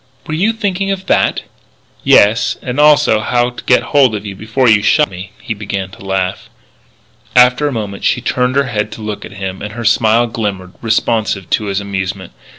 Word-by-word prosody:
"Were 155 - -5
you 190 +8 +2
thinking 200 -3 -2
of 190 -1 -3
that?" - - +1 0.6
"Yes, 110 +4 +4
and 125 +3 -3
also 150 -6 +5
how 120 +2 0
to 120 - -10
get 125 - +3
hold 135 -6 +4
of 105 - -6
you 100 -2 -6
before 115 +6 0
you 110 -2 +5
shot 150 +8 +2
me." 90 +1 -8
He 120 - -4
began 100 -2 -5
to 115 +1 -13
laugh. 95 -1 -2 0.9
After 125 +3 +5
a - - -1
moment 105 -5 -5
she - - +2
turned 125 +1 -1
her 140 - +3
head 110 -5 -3
to 110 - -9
look 105 -1 -5
at - - -11
him, 95 -1 -6
and 105 0 -6
her 120 0 -6
smile 115 +1 +3
glimmered, 100 -5 -4
responsive 110 -3 -1
to 105 - +1
his 100 0 -1
amusement. 95 -2 -4
110 Hz, 195 wpm, -15 LUFS, 100-125 Hz, 0.9 s, also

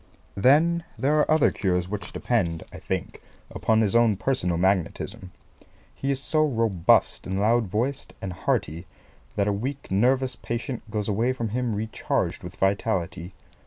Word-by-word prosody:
Then 155 +10 +4
there 150 +3 +2
are - - +2
other 155 -1 +4
cures 90 -3 0
which 100 +1 -5
depend, 85 -9 -1
I - - -8
think, - - -4 0.3
upon 110 0 +2
his 110 0 +1
own 115 -4 +4
personal 90 -9 0
magnetism. 95 0 -1 0.6
He 135 - -4
is 135 -1 +1
so 155 +2 +1
robust 115 - +2
and 95 +1 -2
loud 115 +2 +3
voiced 120 +8 -2
and 95 -2 -5
hearty 85 0 -2 0.5
that 100 -1 +1
a 105 - +2
weak 130 +6 -4
nervous 125 +5 +2
patient 120 0 -5
goes 105 -1 -2
away 115 +5 +1
from 115 -3 -3
him 120 0 -1
recharged 110 +2 -2
with - - -9
vitality. 95 -2 -1
110 Hz, 155 wpm, -25 LUFS, 95-130 Hz, 0.6 s, Then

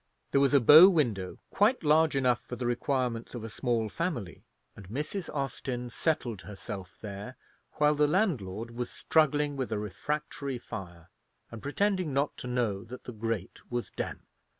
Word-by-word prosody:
There 140 - +4
was 140 +1 +4
a - - +8
bow 155 - +10
window 115 - 0
quite 220 +3 +3
large 155 0 +4
enough 125 -3 +2
for 125 - -7
the 120 0 -4
requirements 120 -1 -1
of 120 - -5
a 115 - -5
small 115 -2 0
family, 120 - -4 0.3
and 100 -4 -12
Mrs. 150 - -3
Austin 130 -3 -3
settled 120 - -1
herself 100 -2 -8
there, 105 +4 -7 0.4
while 150 0 +3
the 150 0 +3
landlord 120 - 0
was 120 +1 -4
struggling 150 -2 +2
with 130 -2 -3
a 110 - 0
refractory 140 - -3
fire, 90 -8 -9 0.4
and 115 -2 -8
pretending 185 +1 0
not 140 +2 0
to - - -6
know 115 -6 -1
that 125 +2 -9
the 125 - -7
grate 110 -3 -3
was 120 -1 -3
damp. - - -5
125 Hz, 165 wpm, -30 LUFS, 110-150 Hz, 0.4 s, bow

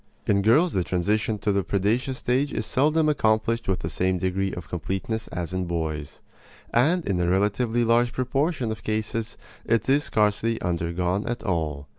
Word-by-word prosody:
In 100 -1 +2
girls 150 - +4
the 95 - +1
transition 105 +5 0
to 105 0 0
the 100 -1 +1
predaceous 115 +8 0
stage 130 +4 0
is - - -2
seldom 155 +4 +2
accomplished 115 -4 +1
with 95 -1 0
the - - -3
same 95 0 +1
degree 95 +2 -1
of 85 -3 -7
completeness 95 +6 -3
as 90 0 -5
in 95 0 -1
boys; 80 -4 -4 0.5
and 155 +8 +3
in 95 -3 0
a 85 0 +1
relatively 105 +5 +1
large 120 +1 +3
proportion 130 0 -1
of 110 -3 -6
cases 110 +2 -3 0.3
it 115 -2 +1
is 140 +2 +3
scarcely 110 +2 +1
undergone 90 +3 -1
at 120 - -3
all. 75 -6 -2
105 Hz, 170 wpm, -25 LUFS, 90-120 Hz, 0.5 s, girls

